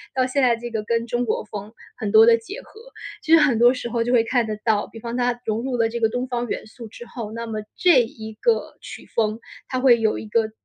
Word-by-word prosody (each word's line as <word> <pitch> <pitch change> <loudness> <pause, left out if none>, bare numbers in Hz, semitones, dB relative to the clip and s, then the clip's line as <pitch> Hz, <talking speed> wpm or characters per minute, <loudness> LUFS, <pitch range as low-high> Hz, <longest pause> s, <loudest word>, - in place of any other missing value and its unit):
到 260 -1 +2
现 260 +2 0
在 245 -2 +4
这 240 +1 -8
个 220 -2 -3
跟 230 +1 -1
中 240 +1 -1
国 225 - -1
风 210 +1 -8 0.2
很 205 -2 -4
多 220 0 +8
的 230 0 +6
结 395 - -9
合。 - - -19 0.5
其 320 - -4
实 330 - +8
很 270 -7 +3
多 240 +1 +7
时 255 -2 -4
候 235 -1 0
就 245 - -2
会 235 -2 +4
看 235 -1 0
得 215 -1 -4
到， 215 -3 +1
比 225 - -12
方 235 +1 -5
它 245 -1 0
融 220 +1 -1
入 255 -1 -2
了 230 -1 +2
这 235 +1 -4
个 225 -1 +2
东 245 +2 -3
方 245 -1 -3
元 - - -4
素 225 +1 -11
之 240 - -11
后， 230 -3 -7
那 230 +1 -5
么 215 -1 -4 0.2
这 345 -8 +5
一 220 -1 -7
个 460 - 0
曲 - - -10
风 220 -1 0 0.3
它 255 - -2
会 250 -3 +5
有 220 -1 +1
一 - - -7
个 220 0 0
235 Hz, 285 characters per minute, -22 LUFS, 220-245 Hz, 0.5 s, 多